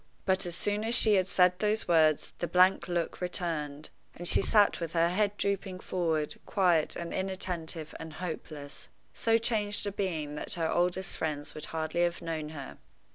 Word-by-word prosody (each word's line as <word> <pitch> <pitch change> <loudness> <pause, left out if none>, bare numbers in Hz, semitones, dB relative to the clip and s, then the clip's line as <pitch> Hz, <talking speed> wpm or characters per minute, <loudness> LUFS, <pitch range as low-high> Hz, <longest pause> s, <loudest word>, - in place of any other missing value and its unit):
But 190 -1 +2
as 170 - -4
soon 205 +3 0
as 230 +2 +2
she 220 -4 +6
had 190 -2 +3
said 180 -1 +3
those 215 +1 +1
words 155 -3 +3
the 175 - -1
blank 180 +1 +4
look 175 -1 -2
returned, 160 -5 -3 0.2
and 175 - -6
she - - +3
sat 205 +1 +4
with 165 -2 -4
her 170 0 +3
head 205 +2 +1
drooping 195 -2 -2
forward, 160 -5 -1
quiet, 175 -6 +2
and 170 -1 -5
inattentive, 175 -4 -3
and 160 -1 -8
hopeless 155 -4 -7 0.2
so 225 0 +2
changed 210 -3 +1
a 205 - -1
being 165 -7 -3
that 150 - -4
her 165 -2 0
oldest 180 +2 0
friends 150 -2 -3
would 155 - -6
hardly 160 +1 -2
have 175 0 +1
known 160 -2 -3
her. 145 -4 -8
175 Hz, 180 wpm, -30 LUFS, 160-190 Hz, 0.2 s, she